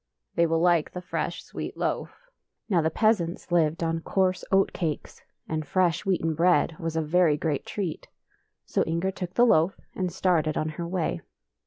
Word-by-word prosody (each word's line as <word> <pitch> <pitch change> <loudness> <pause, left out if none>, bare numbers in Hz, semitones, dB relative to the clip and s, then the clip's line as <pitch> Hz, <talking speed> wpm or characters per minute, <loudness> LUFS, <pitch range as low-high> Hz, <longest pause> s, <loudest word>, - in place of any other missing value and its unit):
" - - -50
They 170 0 +4
will 165 0 +1
like 170 -2 +3
the 180 - -5
fresh - - -3
sweet - - -7
loaf." - - -3 0.4
Now 185 -7 +3
the 160 - +1
peasants 180 -3 0
lived 165 -1 +2
on 165 0 0
coarse 185 +1 0
oat 195 0 +3
cakes, 160 -5 -4 0.3
and 155 -1 -2
fresh 180 +4 +1
wheaten 165 -4 +1
bread 170 0 +3
was 165 -1 -3
a 160 - +1
very 160 -1 +3
great 150 -3 -2
treat. 190 -6 -4 0.6
So - - 0
Inger 170 +4 -1
took 180 -1 -6
the 240 - +6
loaf 175 -5 +3
and 185 -2 -2
started 165 -4 +1
on 155 - 0
her 170 +2 -5
way. 170 - -2
170 Hz, 180 wpm, -26 LUFS, 160-185 Hz, 0.6 s, the